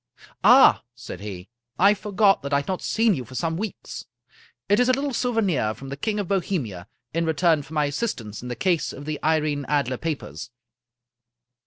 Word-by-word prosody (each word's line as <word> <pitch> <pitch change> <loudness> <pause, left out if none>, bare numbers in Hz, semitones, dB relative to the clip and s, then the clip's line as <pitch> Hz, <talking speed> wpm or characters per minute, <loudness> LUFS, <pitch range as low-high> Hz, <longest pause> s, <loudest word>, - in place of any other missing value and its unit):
" - - -27
Ah! - - +7
" - - -61
said 90 - -7
he, 100 -2 -7 0.3
I 200 +3 +6
forgot 205 -1 +2
that 140 0 -4
I 140 - +3
had - - -14
not 185 -1 -2
seen 225 -1 +2
you 130 - -3
for 130 +2 -12
some 165 +3 -1
weeks. 205 +3 -6 0.6
It 205 - +3
is 250 0 +3
a - - +5
little 275 +1 -1
souvenir 200 - 0
from 135 +5 -10
the 140 - -4
King 210 +8 -2
of 200 - -2
Bo 195 +1 +2
hemia, 110 - -4 0.3
in 165 +1 0
return 160 -1 +2
for 150 +3 -11
my 150 -1 +2
assistance 140 - -3
in 125 - -7
the 120 - -4
case 175 -2 0
of 140 - -9
the 155 -1 -3
Irene 155 -2 +1
Adler 140 -3 0
papers." 160 -3 -5
160 Hz, 205 wpm, -24 LUFS, 135-200 Hz, 0.6 s, Ah